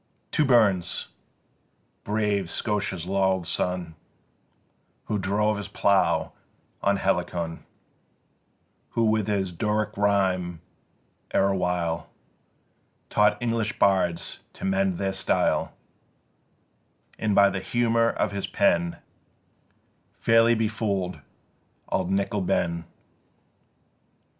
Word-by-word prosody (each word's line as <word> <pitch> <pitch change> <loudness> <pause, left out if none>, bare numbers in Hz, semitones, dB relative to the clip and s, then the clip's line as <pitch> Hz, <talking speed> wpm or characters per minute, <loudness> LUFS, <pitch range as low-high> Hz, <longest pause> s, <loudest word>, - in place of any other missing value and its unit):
To 155 - +2
Burns! 100 -9 +2 0.9
brave 105 -3 0
Scotia's 100 -5 -2
laurel'd 95 -1 +1
son 90 -1 -2 1.1
Who 105 - -1
drove 105 +2 +1
his 100 -1 -5
plough 100 -1 +2 0.5
on 100 0 +2
Helicon 90 -3 -1 1.3
Who 115 - +4
with 110 -1 +1
his 100 -3 0
Doric 105 +4 -1
rhyme 95 -4 +1 0.8
erewhile 90 -4 0 1.0
Taught 105 0 +3
English 115 -3 -1
bards 90 -4 +1
to - - -7
mend 95 -1 +1
their 95 -1 -1
style 95 - +1 1.5
And 105 -2 0
by 100 0 +6
the 95 - -2
humour 115 +2 +1
of - - -1
his 100 -1 -3
pen 85 0 +1 1.2
Fairly 115 +1 +4
befool'd 105 -4 -2 0.7
auld 90 - -1
Nickie 100 +1 0
ben 85 -1 0
100 Hz, 90 wpm, -25 LUFS, 90-105 Hz, 1.5 s, by